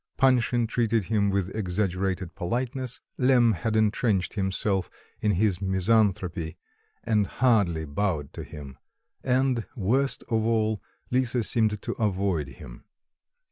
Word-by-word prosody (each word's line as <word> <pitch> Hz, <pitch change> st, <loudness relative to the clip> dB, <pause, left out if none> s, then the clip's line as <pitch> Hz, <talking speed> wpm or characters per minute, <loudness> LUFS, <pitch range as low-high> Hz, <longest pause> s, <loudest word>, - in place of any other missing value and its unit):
Panshin 125 Hz, -2 st, +3 dB
treated 115 Hz, -2 st, +1 dB
him 100 Hz, -2 st, +3 dB
with 95 Hz, -1 st, -1 dB
exaggerated 95 Hz, -2 st, -1 dB
politeness; 125 Hz, +6 st, -3 dB, 0.2 s
Lemm 125 Hz, -3 st, +5 dB
had 110 Hz, +3 st, -2 dB
entrenched 105 Hz, -3 st, +1 dB
himself 95 Hz, -1 st, -1 dB, 0.3 s
in 105 Hz, -1 st, +1 dB
his 100 Hz, 0 st, +1 dB
misanthropy 95 Hz, -4 st, +1 dB, 0.5 s
and 105 Hz, -3 st, +2 dB
hardly 100 Hz, -12 st, +2 dB
bowed 75 Hz, -1 st, -2 dB
to -, -, -6 dB
him, 70 Hz, -3 st, -10 dB, 0.4 s
and, 130 Hz, -2 st, +1 dB
worst 130 Hz, +6 st, 0 dB
of 110 Hz, -2 st, 0 dB
all, 110 Hz, -2 st, +1 dB, 0.3 s
Lisa 125 Hz, -1 st, +1 dB
seemed 110 Hz, -2 st, +1 dB
to -, -, -2 dB
avoid 95 Hz, -7 st, 0 dB
him. -, -, -12 dB
105 Hz, 120 wpm, -26 LUFS, 95-115 Hz, 0.5 s, Lemm